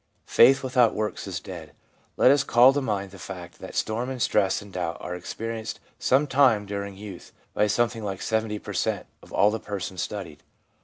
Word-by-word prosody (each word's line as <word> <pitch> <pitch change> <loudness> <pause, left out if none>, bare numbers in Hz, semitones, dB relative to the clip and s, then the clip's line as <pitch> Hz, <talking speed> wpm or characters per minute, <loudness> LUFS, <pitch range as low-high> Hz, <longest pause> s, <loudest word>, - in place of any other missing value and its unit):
Faith 135 0 +5
without 125 -3 +3
works 105 -3 -3
is - - -3
dead/ - - -9 0.4
Let 130 - +6
us 145 0 +4
call 125 +1 +6
to 145 - 0
mind 100 -6 -2
the 95 - -12
fact 90 -1 -9
that - - -9
storm 115 +4 -1
and 130 -1 -5
stress 100 -4 +2
and 100 -1 -13
doubt 85 -2 -3
are 90 - -5
experienced 110 +5 -5 0.2
some 135 +3 +3
time 130 -7 +3
during 100 -1 -5
youth 100 -3 -10 0.2
by 105 - +2
something 115 +1 0
like 95 -2 -4
70 110 -1 -1
per - - -8
cent, - - -1 0.2
of - - -17
all 100 +2 +4
the 110 - -2
persons 95 -3 -5
studied. 95 -8 -6
105 Hz, 195 wpm, -26 LUFS, 95-120 Hz, 0.4 s, Let